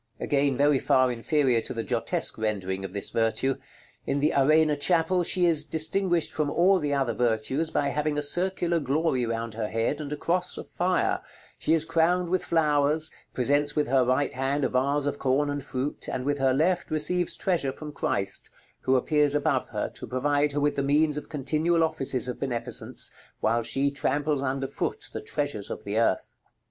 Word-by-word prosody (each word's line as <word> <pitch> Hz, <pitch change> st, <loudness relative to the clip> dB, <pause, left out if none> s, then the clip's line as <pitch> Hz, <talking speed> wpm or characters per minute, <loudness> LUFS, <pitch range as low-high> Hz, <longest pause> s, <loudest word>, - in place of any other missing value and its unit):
Again 140 Hz, -2 st, +1 dB
very 145 Hz, -1 st, +3 dB
far 130 Hz, 0 st, +3 dB
inferior 125 Hz, 0 st, +1 dB
to -, -, -6 dB
the 115 Hz, -, -2 dB
Giottesque 115 Hz, -2 st, -1 dB
rendering 95 Hz, -3 st, -2 dB
of 95 Hz, -, -5 dB
this 100 Hz, 0 st, -2 dB
virtue. 115 Hz, +4 st, 0 dB, 0.5 s
In 140 Hz, -, 0 dB
the 150 Hz, +3 st, +2 dB
Arena 155 Hz, +2 st, +4 dB
Chapel 170 Hz, +4 st, +2 dB
she 180 Hz, +1 st, +2 dB
is 160 Hz, -3 st, +3 dB
distinguished 170 Hz, +2 st, +1 dB
from 150 Hz, -2 st, 0 dB
all 185 Hz, +5 st, +3 dB
the 145 Hz, -3 st, -2 dB
other 135 Hz, -4 st, 0 dB
virtues 120 Hz, +7 st, 0 dB
by 145 Hz, -3 st, 0 dB
having 150 Hz, 0 st, -1 dB
a 150 Hz, -, 0 dB
circular 175 Hz, +2 st, +1 dB
glory 140 Hz, -3 st, 0 dB
round 115 Hz, 0 st, -3 dB
her 110 Hz, -1 st, -3 dB
head, 115 Hz, +7 st, -1 dB
and 145 Hz, -1 st, -6 dB
a 150 Hz, -, -3 dB
cross 180 Hz, +3 st, 0 dB
of -, -, -7 dB
fire; 180 Hz, 0 st, 0 dB, 0.4 s
she 160 Hz, -, +2 dB
is 160 Hz, -1 st, 0 dB
crowned 170 Hz, +2 st, +1 dB
with 185 Hz, +1 st, 0 dB
flowers, 155 Hz, -1 st, +1 dB, 0.2 s
presents 145 Hz, +3 st, +2 dB
with 150 Hz, -1 st, +1 dB
her 130 Hz, -1 st, +4 dB
right 130 Hz, +2 st, +1 dB
hand 135 Hz, +2 st, 0 dB
a -, -, 0 dB
vase 140 Hz, +3 st, +1 dB
of 145 Hz, 0 st, -2 dB
corn 140 Hz, +2 st, +1 dB
and 145 Hz, 0 st, -3 dB
fruit, 130 Hz, +4 st, -3 dB
and 125 Hz, -, -3 dB
with 145 Hz, 0 st, 0 dB
her 135 Hz, -1 st, +3 dB
left 170 Hz, +7 st, +1 dB
receives 170 Hz, +3 st, 0 dB
treasure 170 Hz, -8 st, 0 dB
from 150 Hz, +2 st, -8 dB
Christ, 100 Hz, -8 st, -3 dB, 0.3 s
who 130 Hz, -, +1 dB
appears 145 Hz, +2 st, +2 dB
above 145 Hz, -3 st, 0 dB
her, 105 Hz, -2 st, -2 dB
to -, -, -10 dB
provide 145 Hz, +3 st, +1 dB
her 145 Hz, -, 0 dB
with 145 Hz, 0 st, +1 dB
the -, -, +2 dB
means 150 Hz, +2 st, +2 dB
of 150 Hz, -, -6 dB
continual 155 Hz, +4 st, +1 dB
offices 135 Hz, -5 st, -1 dB
of 125 Hz, -, -5 dB
beneficence, 120 Hz, -3 st, -2 dB, 0.3 s
while 115 Hz, +2 st, +1 dB
she 135 Hz, +4 st, 0 dB
tramples 145 Hz, +1 st, -1 dB
under 135 Hz, 0 st, -1 dB
foot 135 Hz, -, -4 dB
the -, -, -4 dB
treasures 110 Hz, -1 st, -3 dB
of -, -, -6 dB
the 105 Hz, +2 st, -1 dB
earth. 115 Hz, -5 st, 0 dB
145 Hz, 190 wpm, -26 LUFS, 130-155 Hz, 0.5 s, Arena